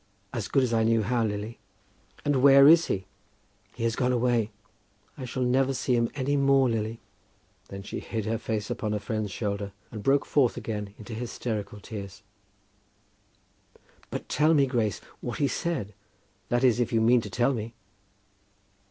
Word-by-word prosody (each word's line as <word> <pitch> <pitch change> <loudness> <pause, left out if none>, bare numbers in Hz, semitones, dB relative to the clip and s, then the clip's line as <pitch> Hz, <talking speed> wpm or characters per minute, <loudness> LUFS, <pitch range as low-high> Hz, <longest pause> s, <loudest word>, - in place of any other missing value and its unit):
"As 115 -6 -3
good 135 - +2
as 120 -2 0
I 115 - +3
knew 115 0 +3
how, 120 +2 +1
Lily." 105 +1 -3 0.7
"And 145 -3 +2
where 140 0 +8
is 165 +2 +7
he?" 95 -1 -2 0.7
"He 115 - -5
has 115 -1 +1
gone 125 0 +1
away. 120 -3 +1 0.7
I 130 - -6
shall 130 +1 -2
never 130 +2 +2
see 125 0 +1
him 115 -1 +1
any 145 +1 0
more, 135 -1 +4
Lily." 115 -1 -2 0.7
Then 100 0 -8
she - - -5
hid 110 -3 -4
her 110 0 -1
face 110 -3 -3
upon 105 -1 -2
her 105 - -1
friend's 110 -1 -3
shoulder 100 0 -3 0.2
and 110 - -6
broke 135 +5 +2
forth 130 -5 +2
again 105 -3 -5
into 110 +1 -9
hysterical 110 -3 -4
tears. 100 -2 -8 1.9
"But - - -5
tell 155 +2 +3
me, 140 -2 +5
Grace, 115 -7 -1 0.2
what 120 - -5
he 145 - +2
said; 130 - -2 0.6
that 120 +1 +1
is, 125 -2 +4
if 120 - 0
you 115 - +2
mean 120 +2 +4
to 105 - -7
tell 120 +7 +1
me!" 115 -1 -5
115 Hz, 170 wpm, -27 LUFS, 105-130 Hz, 1.9 s, where